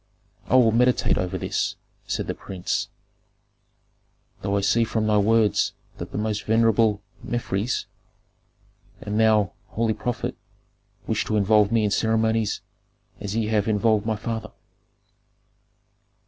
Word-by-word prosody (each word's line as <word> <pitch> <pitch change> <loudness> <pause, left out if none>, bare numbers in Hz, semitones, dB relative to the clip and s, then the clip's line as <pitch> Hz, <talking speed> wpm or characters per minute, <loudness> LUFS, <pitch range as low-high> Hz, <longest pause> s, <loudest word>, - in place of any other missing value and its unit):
"I - - +2
will 120 -3 +6
meditate 125 +2 +2
over 90 -1 -2
this," - - -2 0.3
said - - -2
the - - -3
prince. 95 -2 -3 1.5
"Though 100 0 0
I - - +1
see 115 +4 +3
from 110 -1 -1
thy 105 -1 +3
words 110 -1 +3 0.3
that - - -6
the - - -4
most 105 -1 -1
venerable 110 -2 +3 0.2
Mefres, 120 -1 -2 1.1
and 105 +1 -3
thou, 110 -4 +4 0.2
holy 115 0 0
prophet, 120 +2 -3 0.7
wish - - 0
to 110 - 0
involve 105 +1 +4
me 115 -1 +3
in 105 - +1
ceremonies 110 0 +1 0.6
as 105 0 -4
ye 110 -1 0
have 105 -2 +1
involved 110 0 +2
my 110 - +1
father." 110 +1 -4
110 Hz, 130 wpm, -24 LUFS, 105-115 Hz, 1.5 s, will